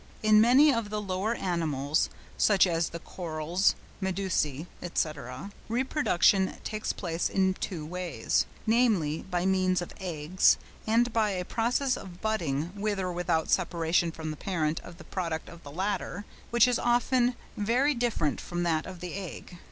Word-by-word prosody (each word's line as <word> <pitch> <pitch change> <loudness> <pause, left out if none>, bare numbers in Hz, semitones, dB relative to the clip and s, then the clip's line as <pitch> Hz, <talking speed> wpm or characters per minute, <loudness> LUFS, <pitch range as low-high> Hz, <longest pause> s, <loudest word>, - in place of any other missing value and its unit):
—In 215 0 +6
many 270 +6 +6
of 230 -3 -2
the 210 0 -2
lower 200 +3 -1
animals 155 - 0 0.3
(such 205 -3 +5
as 170 -2 0
the 170 - -6
Corals, 170 +1 0 0.3
Medusæ, 180 -6 -1 0.3
&c.) 140 -1 -2 0.2
reproduction 225 - +2
takes 215 0 -2
place 170 -3 -2
in 190 -1 +2
two 170 -4 -5
ways, 175 -7 -1 0.2
namely, 215 -10 +2
by 180 -1 0
means 185 -1 +2
of 175 - -6
eggs 175 -1 +2 0.3
and 235 +2 +3
by 220 -2 +2
a 180 -2 -2
process 250 +5 +1
of 180 -2 -10
budding 170 -8 -1
with 205 0 -1
or 185 -1 -2
without 175 -2 0
separation 170 -1 +2
from 160 -1 -5
the 155 - -7
parent 160 -4 -1
of 175 -1 -12
the - - -11
product 165 -4 -3
of 170 - -12
the 145 - -10
latter, 195 +3 -3 0.2
which 235 0 +5
is 245 - +1
often 245 +1 +2 0.2
very 245 +8 +2
different 235 - 0
from 175 0 -3
that 160 -2 0
of 185 -2 -9
the 180 -1 -5
egg. 185 -2 -7
185 Hz, 160 wpm, -29 LUFS, 165-215 Hz, 0.3 s, In